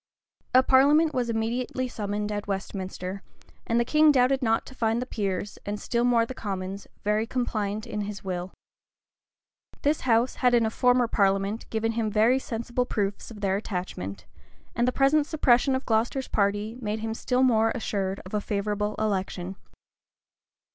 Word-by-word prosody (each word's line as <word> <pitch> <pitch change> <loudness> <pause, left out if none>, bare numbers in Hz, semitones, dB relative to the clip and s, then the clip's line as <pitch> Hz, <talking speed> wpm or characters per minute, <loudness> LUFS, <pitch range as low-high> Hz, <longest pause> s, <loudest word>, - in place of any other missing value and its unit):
A 255 - +8
parliament 290 +5 +5
was 245 -2 -1
immediately 235 +3 -1
summoned 210 -2 -3
at 205 0 -4
Westminster; 190 -1 -4 0.5
and 230 +1 +2
the 235 - +2
king 305 +3 +5
doubted 265 0 +3
not 225 -2 +1
to - - -11
find 225 -2 0
the 250 - -2
peers, 200 -4 -3
and 205 +1 -4
still 235 +2 0
more 240 -2 +3
the 260 - -7
commons, 195 -3 -5 0.2
very 210 +2 +1
compliant 215 -4 -2
with 210 - -4
his 205 -1 -6
will. 180 -1 -4 1.3
This 295 +2 +2
house 240 0 +2
had 250 -1 +5
in 230 -1 +3
a 220 - -1
former 250 0 +3
parliament 195 +1 0
given 225 0 0
him 225 -1 -1
very 220 +5 +3
sensible 240 0 -3
proofs 200 -3 -2
of 215 -3 -11
their 195 -1 +1
attachment;[] 180 - -5 0.5
and 240 +1 +2
the - - +3
present 285 +3 +3
suppression 265 -4 +3
of 260 - -3
Glocester's 235 +4 0
party 205 +2 0
made 215 -1 -2
him 225 0 -2
still 250 +3 0
more 225 -3 +4
assured 195 -3 -2
of 185 - -11
a 210 - 0
favorable 210 +1 -2
election. 190 -3 -2
220 Hz, 165 wpm, -26 LUFS, 200-250 Hz, 1.3 s, A